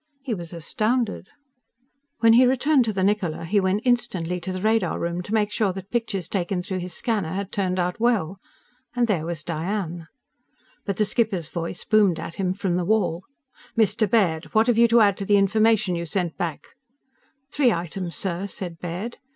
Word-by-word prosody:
He 260 -4 -2
was 170 -5 -6
astounded. 215 +6 -1 0.9
When 225 -1 +6
he 250 +2 +6
returned 265 +1 +3
to 220 - 0
the 190 -2 -1
Niccola, 190 -6 0
he 200 +5 +2
went 195 +3 0
instantly 180 -8 0
to 180 +2 -5
the 185 - -4
radar 220 +2 +1
room 170 +1 -2
to 190 - -9
make 210 -2 +1
sure 210 -2 +1
that 190 +1 -9
pictures 225 -7 -2
taken 180 -1 -2
through 185 0 -3
his 180 0 -6
scanner 210 -8 -1
had 195 0 -4
turned 190 -3 -1
out 180 +2 -1
well. 200 -6 +1 0.6
And 245 -1 +3
there 175 -8 -1
was 170 -2 -4
Diane. 170 0 -3 0.8
But 200 - -2
the 215 - +3
skipper's 195 -8 0
voice 170 +1 -5
boomed 205 -7 +3
at 165 - -6
him 185 -1 0
from 190 -3 -1
the 180 - -1
wall. 185 -4 0 0.5
"Mr. 215 -1 +2
Baird! 175 -7 +2
What 220 +1 +5
have 235 -2 +2
you 235 - +7
to 230 0 +5
add 200 -2 +4
to 195 - -4
the 205 +1 +4
information 215 0 +3
you 170 0 -3
sent 175 -1 -2
back?" 175 +5 -4 0.8
"Three 270 -5 +3
items, 175 -1 -3
sir," 190 +1 -3
said 175 -4 -6
Baird. 180 +7 -5
195 Hz, 190 wpm, -24 LUFS, 175-220 Hz, 0.9 s, you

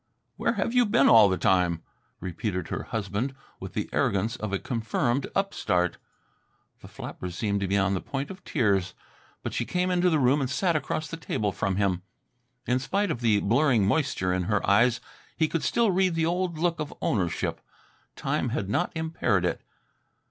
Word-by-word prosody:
"Where 235 - 0 0.2
you 245 -2 +4
been 140 -9 +4
all 110 -4 +8
the 95 - 0
time?" 90 -4 +2 0.4
repeated 90 0 -3
her - - -4
husband 110 +5 -3 0.2
with - - -8
the - - -1
arrogance 105 +4 +1
of 110 -4 -5
a 100 - +1
confirmed 120 +4 -1
upstart. 90 - 0 0.8
The - - -12
flapper 90 - -7
seemed 100 +3 -1
to 100 - 0
be 100 +2 +1
on 100 0 +2
the 95 - -1
point 140 +3 -4
of 190 - -11
tears, 100 - +1 0.5
but - - -4
she - - 0
came 180 0 0
into 180 0 +3
the 160 - +3
room 140 +1 +3
and 130 - -1
sat 170 +4 +1
across 155 +1 -2
the 165 - -6
table 105 -10 -2
from 95 0 -1
him. 95 -2 +1 0.6
In 125 +1 +1
spite 195 +8 0
of 120 - -3
the 110 -3 +3
blurring 120 -1 +3
moisture 100 - +1
in 90 -1 -1
her 105 0 0
eyes 115 +4 +4 0.4
he 160 - +3
could 165 0 -2
still 225 +9 +2
read 185 -1 +2
the 165 -1 +1
old 175 0 -1
look 170 0 0
of 150 -1 -3
ownership. 90 -5 -1 0.5
Time - - -1
had 100 - -2
not 175 - +1
impaired 160 - 0
it. - - -1
120 Hz, 185 wpm, -27 LUFS, 100-160 Hz, 0.8 s, all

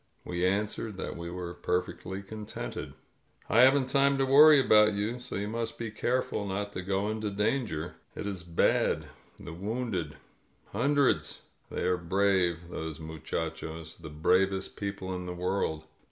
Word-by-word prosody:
We 85 0 -2
answered 105 +1 -1
that - - -4
we 85 0 -6
were 90 0 -5
perfectly 90 +2 -3
contented. 105 +1 -6 0.5
"I 115 - +3
haven't 130 +2 +6
time 140 +1 +3
to 135 - +2
worry 145 +2 +8
about 105 -4 +6
you, 105 +5 -2
so 125 +1 -6
you 100 +1 -2
must 115 +1 -3
be 115 -2 -4
careful 120 -2 -1
not 100 +1 -3
to - - -3
go 95 +2 -1
into 110 -1 -2
danger. 105 - -1 0.2
It - - -5
is 100 -3 -3
bad 85 -1 +2 0.2
— - - -31
the 85 - -9
wounded. 100 -4 -3 0.6
Hundreds. 140 +6 +1 0.3
They - - -4
are 90 - +2
brave, 90 -1 +1
those 80 -1 -5
muchachos; 80 0 -5
the 80 -2 -9
bravest 95 +5 +1
people 100 -2 -4
in 90 0 -5
the 90 - -4
world. 90 -3 -1
100 Hz, 155 wpm, -29 LUFS, 85-110 Hz, 0.6 s, worry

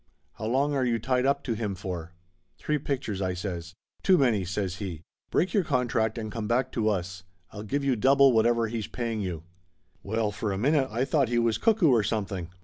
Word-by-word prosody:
How 110 - -3
long 140 +5 +1
are 135 -2 +1
you 120 -2 +1
tied 125 +3 +1
up 140 0 +1
to 120 - -1
him 105 -3 -3
for?" 90 -3 -6 0.4
"Three 150 -1 -1
pictures," 130 -8 -3
I 95 -1 -1
says. 90 -2 -5 0.3
"Too 190 -2 +5
many!" 120 - +2
says 95 0 -3
he. 90 -6 -6 0.3
"Break 185 - +1
your 200 - +3
contract 120 -6 0
and 110 -2 -4
come 110 0 -4
back 125 +3 +1
to 110 -2 +1
us. 95 -1 -3 0.3
I'll 105 - -7
give 140 +7 -2
you 135 -2 +2
double 135 +4 +5
whatever 115 +1 +3
he's 110 -2 -4
paying 115 -3 -3
you 85 -5 -4 0.3
!" - - -41
Well, 110 +1 -1
for 100 +2 -3
a 95 - -2
minute 135 +5 +2
I 120 +5 0
thought 135 -3 +1
he 120 - +1
was 115 -2 +2
cuckoo 220 - +4
or 120 -3 +4
something. 100 -5 -3
115 Hz, 215 wpm, -27 LUFS, 100-130 Hz, 0.4 s, Too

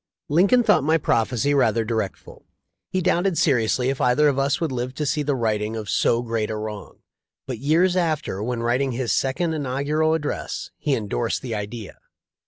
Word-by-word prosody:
Lincoln 195 +11 +4
thought 210 - +4
my 160 +3 +3
prophecy 130 -1 +1
rather 115 -5 +2
dire 110 -3 0
ful. - - -16 0.4
He 185 - -1
doubted 175 0 +1
seriously 125 -2 +2
if 135 - -2
either 135 +5 +4
of 140 -1 0
us 140 +1 +1
would 165 -4 -1
live 125 +1 -3
to 150 - -2
see 150 +2 0
the 145 -1 0
righting 110 -2 -1
of 105 -3 -4
so 120 +1 +2
great 115 -2 -2
a 110 - -3
wrong; 105 -1 -7 0.4
but 125 -4 -5
years 165 +7 +2
after, 155 - -1
when 115 +1 -2
writing 125 +3 +1
his 120 -1 -1
second 160 +5 0
Inaugural 150 +3 0
ad 160 - -3
dress, 145 - -4
he 145 -3 +1
endorsed 115 +2 -2
the 120 -3 -4
idea. 105 0 -6
130 Hz, 190 wpm, -23 LUFS, 115-150 Hz, 0.4 s, Lincoln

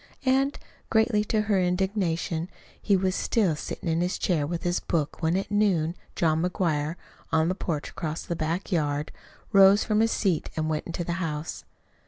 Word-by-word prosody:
And, 270 +2 +2 0.3
greatly 220 -1 +3
to 215 0 +1
her 205 -2 +1
indignation, 180 -2 0 0.3
he 200 -2 +3
was 185 0 +1
still 195 -9 +1
sitting 170 - -6
in 165 +1 +1
his 180 +2 0
chair 155 -6 0
with 170 +1 -3
his 175 0 +1
book 155 -4 -2
when 165 +2 +2
at 195 - -3
noon 190 -6 +2 0.2
John 160 -1 +2
McGuire, 165 -4 0 0.4
on 160 +1 +3
the - - +1
porch 165 -5 -3
across 160 0 -4
the 170 - -3
back 165 +5 -2
yard, 150 -3 0 0.4
rose 195 0 +7
from 215 -1 +1
his 225 0 +3
seat 185 -7 0
and 155 0 0
went 155 - -2
into 170 0 -3
the 170 - -2
house. 155 -1 -4
175 Hz, 180 wpm, -26 LUFS, 160-195 Hz, 0.4 s, rose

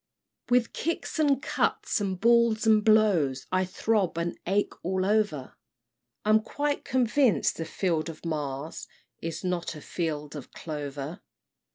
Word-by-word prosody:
"With 245 -1 +3
kicks 335 0 -3
and 285 -4 +3
cuts, - - 0
and 190 -2 -2
balls 235 -1 +4
and 215 -1 +5
blows, 195 -12 +3
I 185 0 +2
throb 190 -1 0
and 170 0 -1
ache 200 +2 +1
all 185 +1 0
over; 205 -10 0 0.7
I'm 215 +1 +5
quite 290 +5 -2
convinc'd 250 - +2
the 165 - -4
field 165 -2 -1
of 165 +1 -10
Mars 150 -2 -4 0.3
Is 165 +1 -4
not 180 -2 -2
a 150 - -9
field 150 -4 -3
of 140 -4 -8
clover! 145 0 -6
185 Hz, 140 wpm, -28 LUFS, 155-220 Hz, 0.7 s, and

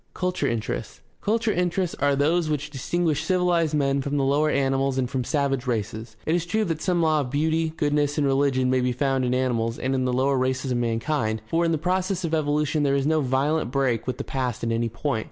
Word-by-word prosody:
Culture 180 0 -1
interests. 115 -2 -3
— - - -41
Culture 220 +1 +1
interests 180 -1 0
are 140 0 +2
those 155 +4 +1
which 150 0 -2
distinguish 155 +2 -1
civilized 175 -4 +1
men 140 -1 +1
from 145 +2 -2
the 140 - +1
lower 145 +3 +2
animals 135 -1 +1
and 130 -1 +1
from 130 0 -2
savage 135 -1 -1
races. 110 -1 -3
It 160 - +1
is 175 0 0
true 215 +5 +1
that 165 -3 -3
some 175 -2 +1
law 155 -1 +3
of 135 -4 -2
beauty, 160 +3 +1
goodness, 145 0 +1
and 150 - +2
religion 135 -2 +2
may 130 0 +2
be 125 0 0
found 135 0 0
in 125 0 +1
animals 115 -3 0
and 130 +1 -1
in 130 -1 0
the 125 - +1
lower 130 +2 +1
races 130 +1 -1
of 120 - +1
mankind, 115 -1 -1
for 165 +8 0
in 165 - +1
the 160 - +1
process 185 +3 -1
of 165 -1 -2
evolution 150 0 +1
there 140 -1 +2
is 140 -1 0
no 155 +1 +2
violent 135 +2 0
break 130 -3 0
with 130 - -2
the - - -4
past 125 -4 -3
at 115 - 0
any 115 0 0
point. 120 +1 -2
140 Hz, 230 wpm, -24 LUFS, 130-160 Hz, -, law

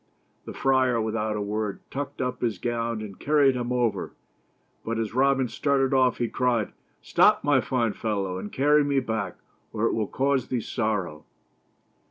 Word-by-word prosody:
The - - -7
friar, 130 -3 +2
without 110 -1 -1
a 105 - -2
word, 105 0 -3
tucked 140 -1 -4
up 125 0 -3
his 115 -5 0
gown 115 +1 -2
and 100 -3 -9
carried 145 -2 +4
him 120 0 -3
over, 120 -2 0 0.7
but 115 0 -2
as 110 -2 -2
Robin 135 0 +3
started 135 +1 +1
off 130 -2 +3
he 120 - 0
cried: 120 -3 0
— - - -42
" - - -43
Stop, - - +4
my 145 -3 +3
fine 120 -5 0
fellow, 100 -4 -2
and 105 - -7
carry 145 +2 +4
me 140 -1 +1
back 110 -7 -3 0.3
or 110 +1 -1
it - - +1
will 110 -2 -1
cause 135 -2 0
thee 125 - -1
sorrow." 105 -10 -2
120 Hz, 180 wpm, -26 LUFS, 110-130 Hz, 0.7 s, carried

